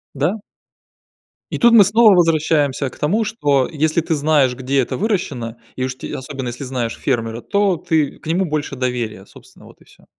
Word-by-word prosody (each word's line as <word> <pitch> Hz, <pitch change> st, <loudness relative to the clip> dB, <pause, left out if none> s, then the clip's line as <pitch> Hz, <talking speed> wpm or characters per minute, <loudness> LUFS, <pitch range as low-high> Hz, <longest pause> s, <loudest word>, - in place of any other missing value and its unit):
Да. 160 Hz, +10 st, 0 dB, 1.1 s
И -, -, -2 dB
тут 235 Hz, -1 st, +5 dB
мы 220 Hz, -3 st, +9 dB
снова 210 Hz, +1 st, +5 dB
возвращаемся 155 Hz, -5 st, +2 dB
к -, -, -16 dB
тому, 200 Hz, +10 st, +1 dB
что 145 Hz, -, +1 dB
если 155 Hz, +1 st, +1 dB
ты 160 Hz, 0 st, -1 dB
знаешь, 145 Hz, -4 st, +2 dB
где 130 Hz, +2 st, -1 dB
это 125 Hz, -, -3 dB
выращено, 145 Hz, -, -2 dB, 0.2 s
и 130 Hz, -, -3 dB
уж 130 Hz, -1 st, -3 dB
те -, -, -7 dB
особенно 130 Hz, -1 st, -6 dB
если 120 Hz, +3 st, -6 dB
знаешь 125 Hz, -3 st, -3 dB
фермера, 115 Hz, -3 st, -2 dB
то 200 Hz, +3 st, +1 dB
ты 155 Hz, -3 st, -1 dB
к -, -, -20 dB
нему 175 Hz, +4 st, +1 dB
больше 150 Hz, -3 st, -3 dB
доверия, 120 Hz, -6 st, -3 dB
собственно, -, -, -18 dB
вот -, -, -18 dB
и -, -, -20 dB
всё. -, -, -22 dB
145 Hz, 190 wpm, -19 LUFS, 130-170 Hz, 1.1 s, мы